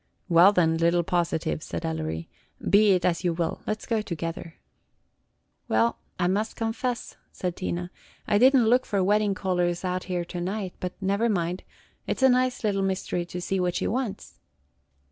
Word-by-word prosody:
"Well, 175 +2 +7
then, 165 -4 +2
little 170 +1 +2
positive," 165 - -1
said 85 - -5
Ellery, 80 0 -3 0.4
"be 205 0 +5
it 180 -1 +1
as 175 0 +1
you 175 -2 +1
will; 165 -1 -2
let 215 0 -2
's - - -8
go 225 -2 0
together." 165 -3 -5 1.1
"Well, 115 +2 +2 0.2
I 175 - 0
must 205 +4 -1
confess," 235 +2 -3
said 180 -2 -3
Tina, 175 -1 -4 0.4
"I 205 - +3
did 260 +4 +6
n't 245 -4 +5
look 250 +3 +3
for 200 -3 +1
wedding 205 +1 +2
callers 180 -1 -1
out 185 0 -2
here 180 -2 -2
to 175 0 -6
night; 190 +1 -3
but 180 -1 -4
never 200 +4 +1
mind, 180 -2 -1 0.5
it - - -1
's - - -1
a 265 - +7
nice 255 0 +1
little 200 -2 +1
mystery 190 -2 -2
to 180 - -5
see 190 +2 -1
what 180 -1 0
she - - -1
wants." 245 -3 -3
185 Hz, 185 wpm, -26 LUFS, 170-210 Hz, 1.1 s, Well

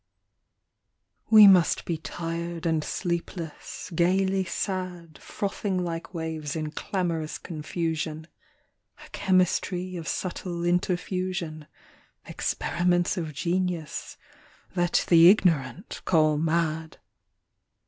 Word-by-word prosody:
We 215 -2 +10
must 185 -4 +5
be 170 - -1
tired 170 +1 -5
and 160 -2 +1
sleepless, 170 0 -4
gaily 190 +3 +2
sad, 180 -3 -4
Frothing 200 -1 -3
like 165 -1 -4
waves 160 -3 -4
in 155 -1 -3
clamorous 170 -5 -2
confusion, 160 -1 -4 0.8
A - - -17
chemistry 185 0 +1
of 165 - -7
subtle 175 -1 -3
interfusion, 175 -2 -1 0.6
Experiments 175 +2 0
of 160 -5 -4
genius 175 0 -2 0.6
that 175 -1 +1
the 170 0 +8
ignorant 175 -4 +1
call 155 -3 +3
mad. 160 0 -1
170 Hz, 90 wpm, -26 LUFS, 160-185 Hz, 0.8 s, We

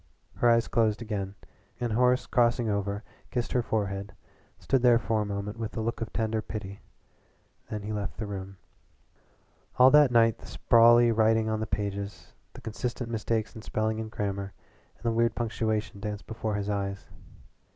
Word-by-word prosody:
Her 120 - +4
eyes 115 0 +4
closed 110 -1 +1
again 100 -3 -4 0.4
and 120 -2 -1
Horace 125 +2 +3
crossing 120 -1 +2
over 100 0 -2 0.3
kissed 120 -2 -2
her 125 - +2
forehead 100 -3 -3 0.4
stood 135 -2 +1
there 120 -1 +6
for 115 -2 0
a - - -1
moment 100 +2 -4
with 115 0 -5
a - - 0
look 115 +1 -3
of 115 - -3
tender 110 0 -1
pity. 100 -2 -7 0.9
Then 105 -1 -4
he 105 +1 -4
left 105 -2 -4
the 110 - -3
room. 95 -1 -7 1.2
All 130 +1 +8
that 150 -2 +7
night 115 -2 +4
the - - -12
sprawly 120 0 +5
writing 110 0 +3
on 110 - -1
the 110 - -3
pages, 100 0 -4 0.2
the - - -11
constant 120 +2 -4
mistakes 110 0 -1
in 110 - -8
spelling 110 +1 -1
and 110 -1 -4
grammar, 100 -2 -3 0.4
and - - -22
the 115 - +1
weird 115 0 +1
punctuation 110 -2 -2
danced 105 0 -5
before 110 -1 -3
his 100 -1 -2
eyes. 100 -1 -3
110 Hz, 170 wpm, -28 LUFS, 100-115 Hz, 1.2 s, All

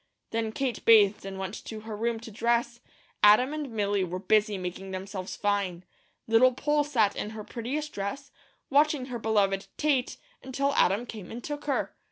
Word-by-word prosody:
Then 225 -1 -1
Kate 255 -1 -2
bathed 210 -3 +5
and 195 0 -6
went 190 +2 -5
to 220 -1 -7
her 220 0 -6
room 230 +1 -1
to 230 - -9
dress. 235 +2 0 0.4
Adam 215 +7 +6
and 300 -3 -4
Milly 205 -3 0
were 180 0 -3
busy 210 +2 +2
making 185 +1 -6
themselves 190 0 -5
fine. 200 -4 -1 0.4
Little 235 +3 +5
Poll 295 +2 +1
sat 225 -9 +1
in 210 - -3
her 215 - -6
prettiest 275 +8 -4
dress, 200 +8 -5 0.4
watching 290 -1 +3
her 240 - -3
beloved 200 -3 +1
"Tate," 280 -5 +1 0.2
until 275 +2 -1
Adam 205 -1 +2
came 215 -6 -9
and 235 +1 -7
took 295 -1 -5
her. 280 -2 -1
220 Hz, 175 wpm, -28 LUFS, 200-255 Hz, 0.4 s, Adam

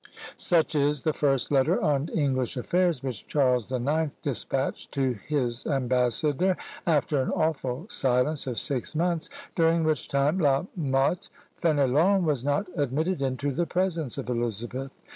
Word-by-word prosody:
Such 165 -3 +2
is 145 -2 +1
the 155 - +1
first 135 -3 +1
letter 135 -2 +3
on 145 0 +1
English 130 -5 -1
affairs 170 +1 +1
which 125 -7 -5
Charles 125 -5 +1
the 130 -1 -1
Ninth 150 +4 -1
despatched 135 0 -2
to 130 -5 0
his 125 -5 -1
ambassador, 135 - +1 0.3
after 150 -3 +2
an 130 - -2
awful 155 -2 -1
silence 135 - +1
of 125 -3 -3
six 135 +6 -1
months, 170 0 0 0.3
during 165 0 +3
which 155 -3 0
time 140 +6 +1
La 140 -1 +2
Motte 140 +1 0 0.3
Fénélon 160 +5 +3
was 145 -7 0
not 145 +7 0
admitted 150 +3 -1
into 135 +1 -1
the 170 +5 -1
presence 170 -7 -1
of - - -5
Elizabeth. 120 +2 -2
140 Hz, 145 wpm, -27 LUFS, 130-160 Hz, 0.3 s, letter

